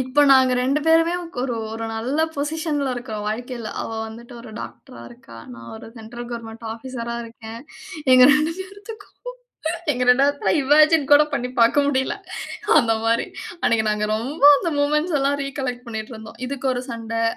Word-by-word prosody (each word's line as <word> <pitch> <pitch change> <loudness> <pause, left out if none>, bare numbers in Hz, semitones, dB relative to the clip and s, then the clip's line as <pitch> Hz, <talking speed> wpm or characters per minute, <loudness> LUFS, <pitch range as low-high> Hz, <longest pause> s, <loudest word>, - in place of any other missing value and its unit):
இப்ப 260 +3 +2
நாங்க 260 -1 +6
2 275 +4 +1
பேருமே 330 +1 +4 0.3
ஒரு, 250 -2 -2 0.2
ஒரு 225 0 -5
நல்ல 250 +7 -2 0.2
பொசிஷன்ல 295 -1 -2
இருக்கோம், 220 -4 -6
வாழ்க்கையில. 235 +1 -5
அவ - - -4 0.2
வந்துட்டு 235 +2 -12
ஒரு 230 -1 -11
டாக்டரா 115 - -10
இருக்கா. 120 -1 -14 0.2
நான் 115 0 -11
ஒரு 225 - -11
சென்ட்ரல் 235 +2 -9
கவர்ன்மென்ட் 230 -1 -7
ஆஃபீசரா 235 0 -6
இருக்கேன். 225 0 -10 0.5
எங்க 255 - +8
2 305 +2 +1
பேத்துக்கும் 405 +3 -10 0.8
எங்க 250 -1 -3
2 270 +3 +5
பேத்துல 285 0 0
இமேஜின் 305 +1 +4
கூட 290 - +8
பண்ணி 250 +1 -2
பாக்க 230 +3 +4
முடியல. 265 -2 0 0.7
அந்த 225 -2 +1
மாதிரி 230 +1 +1 0.4
அன்னைக்கு 225 -1 +2
நாங்க 210 0 -1
ரொம்ப 265 +8 -5 0.2
அந்த 340 - -2
மொமென்ட்ஸ் 300 +3 +1
எல்லாம் 280 +1 +1
ரிகலெக்ட் 260 -3 -5
பண்ணிட்டு 220 +1 -6
இருந்தோம், 220 +1 -11
இதுக்கு 270 +1 -4
ஒரு 245 0 -3
சண்டை, 230 -1 -3
250 Hz, 160 wpm, -22 LUFS, 230-285 Hz, 0.8 s, எங்க